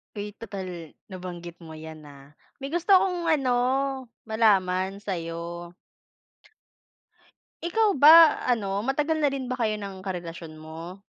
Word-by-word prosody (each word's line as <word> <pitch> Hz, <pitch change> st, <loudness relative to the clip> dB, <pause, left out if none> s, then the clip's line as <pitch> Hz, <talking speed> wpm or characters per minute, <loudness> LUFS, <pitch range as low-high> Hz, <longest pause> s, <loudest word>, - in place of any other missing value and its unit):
Eh, 205 Hz, 0 st, -6 dB
total 185 Hz, -7 st, -7 dB, 0.2 s
nabanggit 175 Hz, -3 st, -8 dB
mo 160 Hz, -, -11 dB
yan, 155 Hz, 0 st, -10 dB
ah, 140 Hz, 0 st, -15 dB, 0.2 s
may 275 Hz, -, -5 dB
gusto 345 Hz, +5 st, -1 dB
akong 360 Hz, -3 st, +4 dB
ano, 260 Hz, -5 st, +2 dB, 0.7 s
malaman 195 Hz, -3 st, +2 dB
sa'yo. 170 Hz, -2 st, -5 dB, 1.9 s
Ikaw 410 Hz, +5 st, +2 dB
ba 315 Hz, +3 st, +8 dB
ano, 200 Hz, -4 st, 0 dB
matagal 300 Hz, +5 st, 0 dB
na 290 Hz, -, +3 dB
rin 270 Hz, -2 st, -4 dB
ba 255 Hz, -, -3 dB
kayo 220 Hz, -4 st, -1 dB
ng 195 Hz, -2 st, -7 dB
karelasyon 170 Hz, -4 st, -7 dB
mo? 165 Hz, +4 st, -9 dB
195 Hz, 125 wpm, -26 LUFS, 170-270 Hz, 1.9 s, ba